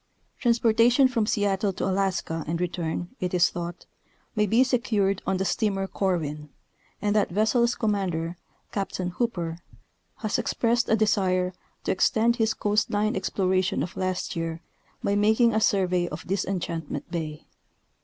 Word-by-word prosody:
Transportation 235 +2 +4
from 230 -4 0
Seattle 205 -2 +1
to - - -3
Alaska 185 -4 -1
and 165 +2 -1
return, 175 -1 -2
it 180 -1 -1
is 175 -1 +4
thought, 175 0 -6 0.5
may 210 -1 +2
be 230 +6 +5
secured 215 -7 +1
on 190 - +1
the 190 - -1
steamer 195 0 0
Corwin, 155 -7 -2 0.5
and 205 0 +1
that 210 - +3
vessel's 235 +5 +2
com 220 -2 0
mander, 175 -4 -2 0.4
Captain 190 -2 -2
Hooper, 175 -6 -2 0.6
has 215 -2 -1
expressed 235 0 +1
a 220 - +5
desire 190 -4 +1 0.3
to - - 0
extend 235 0 +2
his 225 -1 +1
coast 210 +1 +1
line 210 +3 +1
exploration 185 -5 0
of 175 - -6
last 185 0 -2
year 165 0 -3 0.4
by 200 - +1
making 220 +3 +4
a 220 - +2
survey 185 -4 +2
of 150 0 -7
Dis 190 +1 -1
enchantment 170 -5 -4
bay. 155 -3 -4
195 Hz, 150 wpm, -26 LUFS, 175-220 Hz, 0.6 s, be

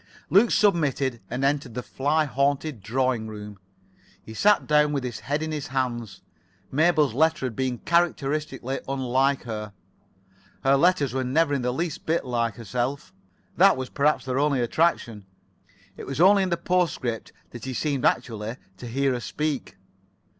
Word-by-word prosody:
Luke 205 +7 +6
submitted 140 - +1
and 125 +3 -1
entered 140 -4 -1
the 125 - -3
fly 150 +3 0
haunted 140 -2 -1
drawing 120 +1 0
room. 105 -2 -9 0.6
He 110 - -10
sat 205 - +3
down 150 0 +3
with 140 -3 -1
his 125 -2 -5
head 145 +3 -2
in 155 - -3
his 150 -2 -4
hands. 120 -6 -3 0.5
Mabel's 155 -3 +3
letter 160 +1 +2
had 120 -4 -4
been 130 -2 -1
characteristically 150 -4 -1
unlike 135 +1 +1
her. 105 -3 -6 0.9
Her 135 +1 +4
letters 150 -4 +2
were 130 0 -1
never 145 +4 +1
in 140 - 0
the 125 0 0
least 160 +4 -4
bit 165 -1 +1
like 115 -3 -1
herself. 120 - -3 0.4
That 195 -1 +6
was 130 -1 -4
perhaps 150 0 +1
their 130 0 -1
only 145 -2 +2
attraction. 120 - 0 0.7
It - - -9
was 135 +1 -4
only 195 +3 +6
in 190 - 0
the 170 - 0
[Pg 170 - -27
84]postscript 160 -10 0 0.2
that 120 0 -9
he 130 - -4
seemed 140 -3 -1
actually 110 -1 0 0.2
to 125 - -8
hear 135 +3 0
her 125 - -2
speak. 145 -5 -3
135 Hz, 165 wpm, -25 LUFS, 120-155 Hz, 0.9 s, Luke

